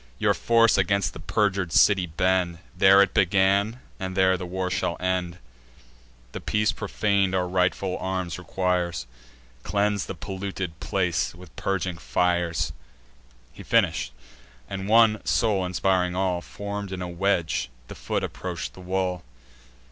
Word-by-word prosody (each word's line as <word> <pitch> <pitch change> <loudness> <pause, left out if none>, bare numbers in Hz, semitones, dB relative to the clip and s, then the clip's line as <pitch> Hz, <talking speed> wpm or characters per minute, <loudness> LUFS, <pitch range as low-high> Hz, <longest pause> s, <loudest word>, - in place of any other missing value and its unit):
Your - - +2
force 115 -3 +3
against 100 +1 +1
the - - -9
perjur'd 95 0 0
city 95 0 +4
bend. 90 +1 +1 0.2
There 95 +1 +7
it 100 - -3
began, 100 +5 +2 0.2
and 95 0 -4
there 95 0 +4
the 90 0 -5
war 90 +1 -3
shall 90 -2 -1
end. 90 -1 -1 0.9
The - - -6
peace 105 +1 +1
profan'd 100 -3 0
our 90 -1 +1
rightful 90 +1 0
arms 95 -2 -3
requires; 90 -5 -1 0.6
Cleanse 100 - 0
the - - -5
polluted 95 -3 -5
place 90 -3 -1
with 90 +1 -14
purging 90 -3 -2
fires." 85 -2 0 0.8
He - - -11
finish'd; 65 - +1 0.6
and, 95 +4 -5
one 110 -1 +5
soul 105 -5 +1
inspiring 90 0 +1
all, 90 -2 0
Form'd 100 +1 -6
in 95 -1 -4
a - - -4
wedge, 90 -4 0 0.2
the - - -8
foot - - -3
approach 90 -2 -5
the - - -15
wall. 90 -1 -1
95 Hz, 140 wpm, -25 LUFS, 90-100 Hz, 0.9 s, There